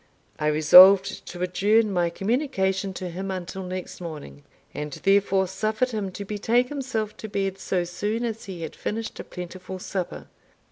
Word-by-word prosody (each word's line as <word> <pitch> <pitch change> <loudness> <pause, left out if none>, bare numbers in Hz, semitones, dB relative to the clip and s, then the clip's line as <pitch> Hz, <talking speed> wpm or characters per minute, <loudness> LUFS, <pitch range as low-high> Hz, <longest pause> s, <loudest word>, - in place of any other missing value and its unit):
I 150 - 0
resolved 185 +6 +7
to 175 0 -5
adjourn 205 +4 +2
my 175 -2 +1
communication 195 - -1
to 180 -1 -5
him 190 +3 -5
until 190 0 -5
next 185 0 -6
morning; 150 - -8 0.3
and 150 0 -5
therefore 195 +1 +2
suffered 215 +6 -1
him 205 -4 -3
to 200 - -6
betake 225 +5 +1
himself 240 -7 -3
to 220 - -7
bed 195 -1 -2
so 185 -1 -1
soon 205 +7 -2
as 225 -1 -4
he 180 -4 -7
had - - -6
finished 225 +1 -4
a - - -4
plentiful 185 +1 -8
supper. 185 -1 -5
195 Hz, 160 wpm, -25 LUFS, 180-215 Hz, 0.3 s, resolved